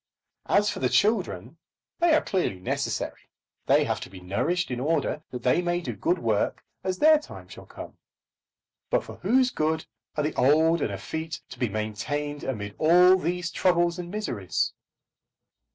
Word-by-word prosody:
As 205 +1 +3
for - - -6
the 125 - +1
children, 165 - 0 0.4
they 340 -2 +5
are 310 - +2
clearly 180 - -1
necessary. 90 - -3 0.4
They - - +5
have - - -1
to - - -8
be 95 0 -11
nourished 125 - -1
in 125 - -2
order 150 +1 0
that 125 -1 -7
they 125 +7 +3
may 175 0 0
do 175 - -5
good 345 +3 +1
work - - 0 0.2
as 185 -1 -1
their 310 +4 +6
time 300 - -11
shall - - -12
come. - - -10 0.9
But - - +1
for - - -10
whose 255 +1 +2
good 160 +1 -1 0.3
are 150 - +1
the 150 - -1
old 160 +4 +3
and 105 - 0
effete 160 - -5
to - - -11
be 125 - 0
maintained 140 +8 -3
amid 105 -6 -4
all 180 +4 +6
these 180 -1 -2
troubles 175 -1 +2
and 175 -1 -6
miseries? 150 - -2
160 Hz, 170 wpm, -26 LUFS, 125-180 Hz, 0.9 s, their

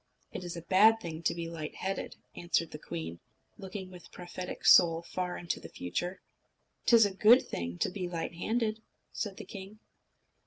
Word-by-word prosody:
"It - - -6
is 175 -1 -5
a 170 - -7
bad 215 +5 +6
thing 165 -6 -6
to 170 - +1
be 170 -1 -4
light 160 -2 -6
headed," 195 +1 -3 0.2
answered 170 -1 0
the 150 - -7
queen, 85 - -6 0.4
looking 190 -1 -7
with 180 -1 -13
prophetic 180 0 -7
soul 165 -1 +7
far 180 +1 -3
into 170 - -3
the - - -10
future. 175 - -4 0.6
"'T 235 - +7
is 225 -2 +8
a 200 - -1
good 220 +6 +6
thing 85 0 -4
to - - +1
be 180 -2 -4
light 170 0 -3
handed," 220 +4 -1 0.3
said 205 -3 -4
the - - -8
king. 200 +1 -9
180 Hz, 185 wpm, -31 LUFS, 165-195 Hz, 0.6 s, is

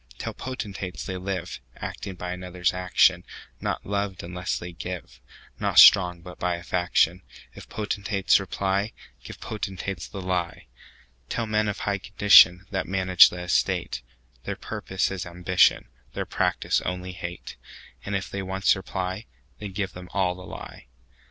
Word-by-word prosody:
Tell - - -5
potentates, 95 - -6
they 95 - -4
liveActing 90 -1 -6
by 90 0 -4
others' 90 0 -1
action; 90 0 +3 0.4
Not - - -3
loved 100 -1 -2
unless 90 +1 -3
they 90 0 -7
give, 85 - -7 0.4
Not - - -1
strong, 90 -3 +8
but 90 -1 -11
by 90 -1 0
a 85 - -9
faction:If 90 0 -1
potentates 100 -2 +1
reply, 95 +2 -1 0.3
Give - - -10
potentates 95 -4 -5
the 100 - -8
lie. 90 -2 -2 0.6
Tell 115 - -1
men 110 0 +1
of 105 - -3
high 100 -1 -1
condition, 95 -2 +6
That 95 -2 -2
manage 95 -1 +6
the 90 - -7
estate, 90 -7 0 0.4
Their - - -4
purpose 95 0 -2
is 95 -2 -3
ambition, 90 +1 +3 0.3
Their - - -2
practice - - 0
only 90 0 -4
hate:And 90 +3 -8
if 100 0 -2
they 100 - -4
once 95 +1 +2
reply, 95 +2 -4 0.3
Then 105 -2 -6
give 95 -1 -3
them 90 0 -10
all 95 -2 +2
the 90 +1 -11
lie. - - -10
95 Hz, 145 wpm, -25 LUFS, 90-100 Hz, 0.6 s, strong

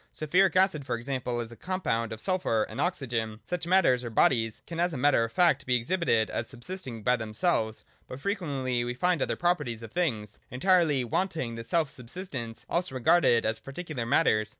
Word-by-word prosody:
Sulphuric 180 +5 +2
acid, 185 -6 +3
for 125 -2 -2
example, 125 0 -3
is 115 0 -7
a - - -10
compound 115 - -2
of 110 - -6
sulphur 175 - 0
and - - -5
oxygen. 120 -10 -2
Such 180 -1 -3
matters 170 -9 +4
or 120 - -4
bodies 115 -1 +2
can 165 -1 -6
as 175 0 +1
a - - -3
matter 135 -2 +3
of 115 - -3
fact 170 +5 +3
be 125 - +3
exhibited 120 -3 +1
as 115 - -3
subsisting 125 - -6
by 125 +2 +4
themselves: 110 0 0 0.2
but 130 - -8
frequently 140 - -1
we 120 0 -3
find 180 +1 +1
other - - 0
properties 145 -10 -1
of 115 - -9
things, 120 -13 -2
entirely 150 0 +3
wanting 130 - -1
this 115 0 -7
self 160 -4 +1
subsistence, 125 - -6
also 175 -5 -2
regarded 125 -2 +4
as 110 0 -1
particular 135 -4 -5
matters. 110 -6 +3
130 Hz, 185 wpm, -28 LUFS, 115-175 Hz, 0.2 s, matters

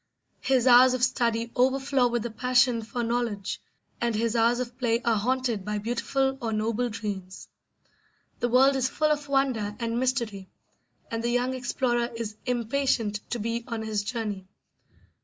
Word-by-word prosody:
His 260 -2 +2
hours 255 0 +7
of 250 - -2
study 235 -2 +1
overflow 265 0 +2
with 240 -2 -1
the 235 - -4
passion 245 0 +2
for 235 +2 -4
knowledge, 230 -4 -2 0.4
and 235 -2 0
his 230 +1 0
hours 235 +1 +3
of 245 -1 -4
play 235 -2 +1
are 230 -1 +2
haunted 240 -1 0
by 210 +1 -2
beautiful 245 +5 -1
or 230 -2 -2
noble 225 +3 0
dreams. 200 -3 -6 0.9
The 240 - 0
world 265 +3 +5
is 260 -1 +1
full 305 +1 +1
of 295 -1 -1
wonder 260 -7 0
and 230 0 -1
mystery, 235 -7 -1 0.6
and 230 0 -2
the 235 - 0
young 245 +2 +1
explorer 245 -1 0
is 225 -2 -5
impatient 240 -3 0
to - - -2
be 230 +1 -2
on 230 -2 -4
his 215 -2 -1
journey. 210 -4 -4
235 Hz, 160 wpm, -27 LUFS, 225-255 Hz, 0.9 s, hours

